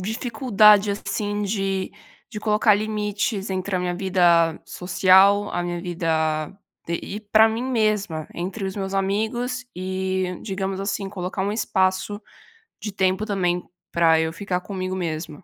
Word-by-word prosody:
dificuldade, 215 -1 +3
assim, 205 0 -3
de 195 -2 -2 0.4
de 210 - -4
colocar 210 0 +3
limites 210 -1 -2
entre 190 +1 -2
a - - +2
minha 180 0 -1
vida 175 -3 +3
social, 190 +3 +4
a 175 - -2
minha 175 0 -3
vida 160 -3 0 0.4
d 170 - -2
e 205 - -5
para 215 +1 +4
mim 225 +3 -3
mesma, 210 -10 0
entre 190 +4 -4
os 190 +1 -4
meus 195 -1 -3
amigos, 220 +6 -1
e, 185 0 -2
digamos 195 -1 -3
assim, 195 0 -3
colocar 190 0 -4
um 200 - -1
espaço 205 -1 0 0.6
de 210 0 -5
tempo, 190 +1 0
também, 180 -4 -1 0.2
pra 165 -1 +4
eu 160 0 0
ficar 180 +1 -3
comigo 185 -1 -4
mesma. 160 -2 -4
195 Hz, 145 wpm, -23 LUFS, 180-210 Hz, 0.6 s, social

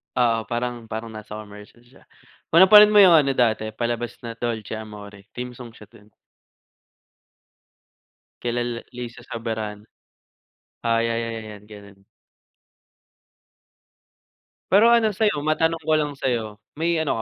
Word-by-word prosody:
Oo, 115 -2 +1
parang 120 -1 -4
parang 110 +1 -6
nasa 110 -1 -9
commercial 105 +2 -12
siya, 120 +2 -22 0.4
kung 170 +3 +6
napanood 210 +2 +8
mo - - +8
yung 175 -3 +7
ano 140 -2 +3
dati 110 -3 +1
palabas 120 0 -3
na 115 0 -7
Dolce 110 -2 -4
Amore, 105 -2 -11
theme 125 0 -5
song 120 -2 -11
siya 105 - -15
do'n. 105 - -19 2.3
Kila 120 0 -1
la 120 -1 -4
Liza 120 -1 -8
Soberano. 110 -2 -5 1.0
Ah, 115 0 +1
ya 115 0 -1
ya 115 0 -3
ya 115 - -6
'yan 105 -1 -11
gano'n. 100 -2 -15 2.7
Pero 220 +5 +6
ano 220 -4 +3
sa'yo 210 -9 +1
matanong 160 +2 0
ko 160 0 -1
lang 150 -1 0
sa'yo, 115 -6 -3 0.2
may 165 +1 0
ano 155 -6 -1
115 Hz, 135 wpm, -23 LUFS, 110-145 Hz, 2.7 s, napanood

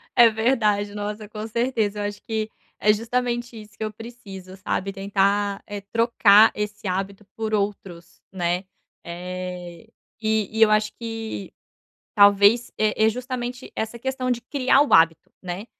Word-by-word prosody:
É 240 -1 +8
verdade, 215 -3 +1
nossa, 210 +1 -5
com 215 +1 -7
certeza. 225 -3 -1
Eu - - -2
acho 205 0 -5
que 220 -2 -3 0.3
é 210 - +4
justamente 240 +1 -2
isso 210 0 -17
que - - -4
eu 215 - -3
preciso, 200 -6 -10
sabe? 195 0 -3
Tentar, 200 +1 0
eh, 205 -1 -6
trocar 225 -2 +5
esse 210 0 -4
hábito 195 +2 -3
por 220 -1 -3
outros, 195 -4 -4
né, 180 0 -1 0.4
eh, 180 0 -7 0.3
e 220 -1 -1
e - - +1
eu 220 - +7
acho 215 0 +2
que 225 -3 -6 0.6
talvez 205 +3 +5
é 215 0 +2
é - - +5
justamente 250 +1 -5
essa 220 +2 -3
questão 260 0 -2
de 240 - -1
criar 270 +2 +2
o 295 - +1
hábito, 165 -1 +4
né. 185 +3 -6
210 Hz, 150 wpm, -23 LUFS, 195-230 Hz, 0.6 s, É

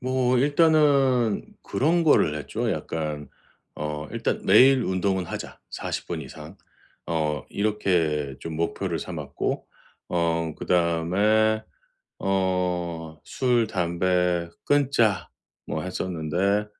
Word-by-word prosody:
뭐 130 0 +1
일단은 140 -5 +3 0.2
그런 165 +4 +1
거를 80 - +4
했죠. 70 -2 -3
약간 75 -3 -4 0.5
어 75 0 -4
'일단 - - -2
매일 130 0 +6
운동은 95 0 0
하자, - - -7
40 - - -4
분 80 -3 -4
이상.' 65 - -11 0.5
어 75 -4 -1
이렇게 85 -9 0
좀 80 - -6
목표를 85 +1 -2
삼았고 - - -4 0.4
어 85 -2 0
그다음에 95 +6 +2 0.6
어 90 -4 -1
'술, 120 -3 +1
담배 90 -2 0 0.2
끊자.' 135 -8 +2 0.4
뭐 - - -3
했었는데 90 +3 -1
90 Hz, 185 characters per minute, -25 LUFS, 80-115 Hz, 0.6 s, 매일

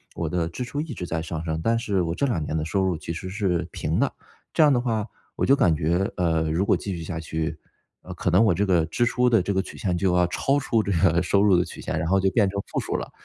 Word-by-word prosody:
我 85 -2 -2
的 85 0 -1
支 90 +9 -5
出 125 +4 -5
一 150 -2 -4
直 90 - -5
在 80 -1 -2
上 80 0 -5
升， 80 -1 -2
但 115 +6 +2
是 105 -5 0
我 85 -1 -2
这 140 - 0
2 120 - 0
年 75 - -3
的 75 - -1
收 95 +4 0
入 95 -3 0
其 80 - -6
实 85 +3 -5
是 90 -4 -1
平 - - -2
的， - - +1 0.4
这 - - +5
样 150 - +6
的 125 - +3
话 115 -4 -1 0.3
我 - - 0
就 135 - +5
感 110 - +3
觉， 85 +5 0
呃， 80 -2 +1
如 85 +5 +1
果 - - +3
继 100 -2 -4
续 85 - -6
下 80 0 -5
去， 80 0 -4 0.4
呃， - - -8
可 - - -2
能 90 +4 +4
我 110 - +4
这 100 +5 +1
个 90 -4 +2
支 85 +9 0
出 125 +1 +2
的 115 -5 +4
这 100 +3 -2
个 95 - +1
曲 - - -10
线 90 -3 -1
就 90 0 +1
要 90 0 +4
超 135 +10 0
出 115 -4 +1
这 100 - -2
个 85 0 +3
收 100 +2 +2
入 100 -3 +5
的 90 - +2
曲 - - -10
线， - - -3
然 80 - -2
后 95 +2 +3
就 95 - +3
变 100 0 +3
成 100 +1 -3
负 - - -1
数 - - -3
了。 - - -4
90 Hz, 315 characters per minute, -24 LUFS, 85-105 Hz, 0.4 s, 样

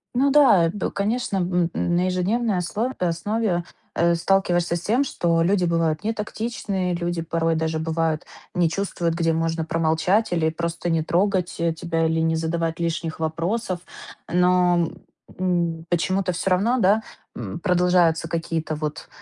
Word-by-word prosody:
Ну 270 +3 +3
да, 230 - +6
б 205 - -2
конечно, 205 0 -1
б 175 -1 +1
м, 175 - 0
на 175 - +2
ежедневной 195 +4 0
ослов 210 +8 -2
основе, 180 +2 0 0.3
э, 170 0 +3
сталкиваешься 175 -1 +1
с 175 - -3
тем, 235 +9 +2
что 170 -7 +1
люди 185 +2 +2
бывают 165 -2 +1
нетактичные, 210 -4 -2
люди 170 0 -2
порой 165 0 0
даже 160 0 -1
бывают, 160 -1 -1 0.3
не 175 -3 +2
чувствуют, 170 -2 -2
где 165 -1 +1
можно 165 0 -1
промолчать 165 +6 +1
или 160 -2 +2
просто 170 +1 -3
не 165 -1 +2
трогать, 180 +2 0
э, 165 0 +1
тебя, 165 0 -1
или 160 0 0
не 160 0 +1
задавать 165 0 -2
лишних 165 -1 -2
вопросов. 175 +5 -1 0.5
Но, 180 -1 +3 0.5
м, 170 -3 0
почему-то 180 +2 0
всё 180 +3 -1
равно, 210 +8 +2
да, 210 +1 +4 0.3
м, 110 +3 -6
продолжаются 180 -3 +3
какие-то 165 -1 -2
вот, 150 0 -5
175 Hz, 150 wpm, -23 LUFS, 165-190 Hz, 0.5 s, да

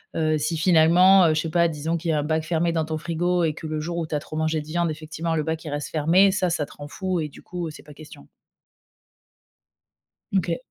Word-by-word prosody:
Heu, 155 -1 +1
si 155 +3 -1
finalement, 180 +3 +5
heu, 155 - +3
je 155 - 0
sais 165 - -4
pas, 170 +1 +3
disons 160 +1 -2
qu'il 165 0 -2
y - - +1
a 150 - +1
un - - -1
bac 155 +1 -1
fermé 170 +1 0
dans 160 -1 -1
ton 155 0 -3
frigo, 175 +2 0
et 160 -2 +1
que 160 - -8
le 155 0 -3
jour 170 +2 -4
où 165 -2 -2
tu 155 - -3
as - - 0
trop 155 +1 -8
mangé 160 0 0
de - - -11
viande, 170 +1 0
effectivement, 160 +2 -4
le 155 - 0
bac 160 +1 -3
il - - -5
reste 145 0 -4
fermé, 170 +6 +4
ça, 190 -2 0
ça 165 -3 -1
te - - -18
rend 145 - -9
fou, 185 +3 -3
et 155 - -2
du 145 - -14
coup, 175 -2 -5
c'est - - -13
pas 150 - -13
question. 145 - -14 2.0
Mmh, 195 - +3
OK. 170 -2 -2
160 Hz, 265 wpm, -24 LUFS, 155-170 Hz, 2.0 s, finalement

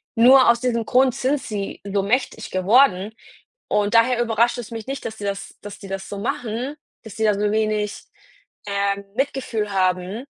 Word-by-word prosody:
Nur 255 +3 +7
aus 235 0 +3
diesem 235 -3 0
Grund 255 +1 +3
sind 270 +3 0
sie 205 -4 -5
so 200 0 -1
mächtig 225 0 -1
geworden 200 +1 +3 0.6
und 205 +2 0
daher 240 +1 +4
überrascht 235 +1 +1
es 235 -1 -7
mich 225 0 -7
nicht, 270 0 -5
dass 220 -1 -5
die 205 - -6
das 200 0 -5
dass 205 -1 -9
die 195 - -10
das 195 0 -5
so 200 - -6
machen, 240 +4 -3 0.3
dass 220 -3 -11
die 220 - 0
da 210 - +4
so 205 +1 0
wenig, 215 -1 -1 0.6
äh, 200 0 0 0.2
Mitgefühl 250 -6 -2
haben, 185 +4 0
220 Hz, 180 wpm, -22 LUFS, 200-245 Hz, 0.6 s, Nur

